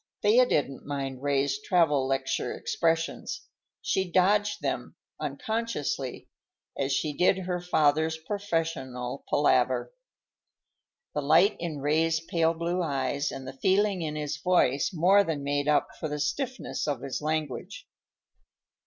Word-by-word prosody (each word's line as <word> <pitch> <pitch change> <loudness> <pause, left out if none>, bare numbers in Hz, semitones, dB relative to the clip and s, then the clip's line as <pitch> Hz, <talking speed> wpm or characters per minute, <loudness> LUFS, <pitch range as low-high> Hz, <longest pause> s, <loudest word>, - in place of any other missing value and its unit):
Thea 235 +5 +5
didn't 140 - -1
mind 135 -2 -4
Ray's 140 0 0
travel 150 -7 +2
lecture 135 0 -1
expressions. 165 0 -1 0.4
She 190 -1 0
dodged 205 +4 +3
them, - - -3 0.2
unconsciously, 220 - -3 0.5
as 135 0 -1
she 150 +2 0
did 180 +5 +3
her 180 -1 -3
father's 160 -2 +2
professional 160 -9 -3
palaver. - - +2 1.2
The 150 - -1
light 165 +8 +4
in 160 -4 -4
Ray's 160 +3 +2
pale 165 0 +1
blue 170 +2 -1
eyes 140 -2 -1
and 135 -1 -7
the 130 - -6
feeling 190 +5 +2
in 155 -2 -3
his 150 -1 -3
voice 150 -5 +2
more 190 +4 +5
than 155 -6 -3
made 145 0 -1
up 150 - +3
for 155 - -3
the 150 0 -3
stiffness 255 - -2
of 140 -4 -1
his 140 +1 -4
language. 155 -3 -3
155 Hz, 130 wpm, -28 LUFS, 140-180 Hz, 1.2 s, Thea